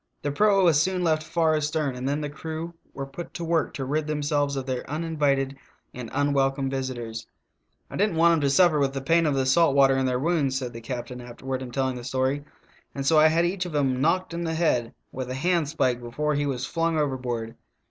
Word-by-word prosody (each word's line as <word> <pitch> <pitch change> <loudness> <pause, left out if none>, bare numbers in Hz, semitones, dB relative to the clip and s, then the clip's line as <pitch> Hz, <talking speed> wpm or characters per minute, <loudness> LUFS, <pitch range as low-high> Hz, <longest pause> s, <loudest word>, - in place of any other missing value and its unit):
The 145 - -1
proa 200 +4 +3
was 160 -4 +5
soon 185 +1 0
left 160 -2 +2
far 160 0 +1
astern, 150 -2 -1
and 125 +2 -3
then 145 +2 -1
the 150 - -2
crew 160 +2 -6 0.2
were 135 - -5
put 135 +6 -9
to 170 - -4
work 165 -1 +1
to 135 - -3
rid 150 +3 -1
themselves 145 -1 0
of 135 -1 -3
their 130 -2 -3
uninvited 145 -3 0 0.4
and 120 -2 -7
unwelcome 135 -1 +1
visi 130 -1 -2
tors. 115 -2 -6 0.6
"I - - -7
did 205 +2 +3
n't 170 - -5
want 170 +1 +5
'em 165 - +1
to 140 - +2
suffer 155 +2 +4
with 135 -1 +1
the 135 - -3
pain 165 +4 +3
of 145 - +1
the 135 -1 +1
salt 140 +2 +4
water 135 -1 +5
in 135 0 +1
their 125 -1 +1
wounds," 140 -2 +1
said 125 -2 -4
the 115 - -8
captain 125 +1 -6
afterward 130 +2 -5
in 130 - -6
telling 130 0 -1
the 120 - -7
story, 130 +3 -1 0.5
"and 140 -1 -3
so 155 +2 +5
I 155 - +7
had 165 +2 +2
each 180 +1 -1
of 160 - -7
'em 130 -3 +1
knoeked 175 +4 +1
in 170 0 -3
the 160 -1 -2
head 125 -8 +1 0.2
with 130 -1 -5
a 130 - -3
handspike 150 -5 +1
before 150 +6 -2
he 145 0 0
was 130 -2 -2
flung 165 +1 0
overboard. 125 -6 -2
145 Hz, 230 wpm, -25 LUFS, 130-160 Hz, 0.6 s, I